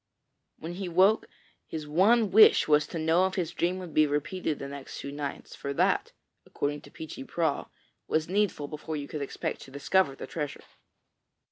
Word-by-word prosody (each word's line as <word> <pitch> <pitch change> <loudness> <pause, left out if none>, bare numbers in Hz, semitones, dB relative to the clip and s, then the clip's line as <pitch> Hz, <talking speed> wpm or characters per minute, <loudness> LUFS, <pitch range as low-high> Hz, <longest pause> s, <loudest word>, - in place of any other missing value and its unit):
When 165 +2 -6
he 185 0 -4
woke, 190 +5 +4 0.4
his 155 -2 -5
one 200 +7 +4
wish 215 +2 +7
was 150 -1 +4
to - - -5
know 165 +3 +3
if 190 - -6
his 170 -3 -1
dream 175 +2 0
would 180 -3 -8
be 155 0 +5
repeated 150 +2 -2
the 140 - -6
next 140 -1 -8
two 140 - -6
nights, 145 -1 -6
for 140 - -4
that, - - +1 0.3
according 145 0 -3
to - - -14
Peechy 160 - -8
Prauw, 165 - -1 0.4
was 155 0 0
needful 190 -6 0
before 155 +1 -5
you 145 -1 -5
could 150 - -5
expect 140 - -4
to - - -11
discover 140 +2 +1
the - - -7
treasure. 150 -3 -5
160 Hz, 180 wpm, -28 LUFS, 145-185 Hz, 0.4 s, wish